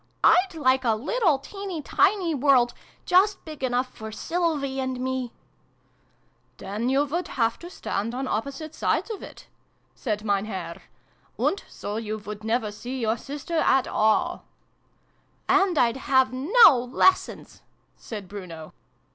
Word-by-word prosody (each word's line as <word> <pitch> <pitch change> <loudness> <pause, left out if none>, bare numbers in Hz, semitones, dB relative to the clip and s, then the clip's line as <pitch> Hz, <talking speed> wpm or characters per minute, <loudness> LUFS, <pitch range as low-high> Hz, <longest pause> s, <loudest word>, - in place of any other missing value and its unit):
" - - -42
I'd 365 -1 +4
like 260 -4 +2
a 225 -3 +2
little 320 - +1
teeny 375 +2 -7
tiny 365 -1 +2
world, 260 -4 +3 0.3
just 385 +3 +3
big 305 -4 -9
enough 250 0 0
for 220 0 -8
Sylvie 295 -1 -1
and 260 -1 -2
me! 260 -1 -2 0.4
" - - -40
" - - -41
Then 205 +5 -3
you 275 +2 +2
would 340 +5 -3
have 230 -2 0
to 345 - -9
stand 230 - -3
on 265 +1 -3
opposite 280 +8 -4
sides 455 - -1
of 420 - -6
it," - - -11 0.5
said 215 -3 -3
Mein 200 -1 +1
Herr. 190 -5 -6 0.3
" - - -37
And 395 - 0
so 205 +1 -5
you 215 -1 -3
would 210 0 -8
never 225 -1 0
see 250 +5 -6
your 225 -1 +1
sister 290 +7 -5
at 265 -4 +3
all 220 +12 +1 0.5
/" - - -40 0.3
"And 385 -3 +3
I'd 235 -1 +3
have 260 -1 +2
no 270 - +5
lessons" 375 +7 +1 0.3
said 210 -4 -8
Bruno. 175 -5 -9
260 Hz, 155 wpm, -25 LUFS, 220-320 Hz, 0.5 s, no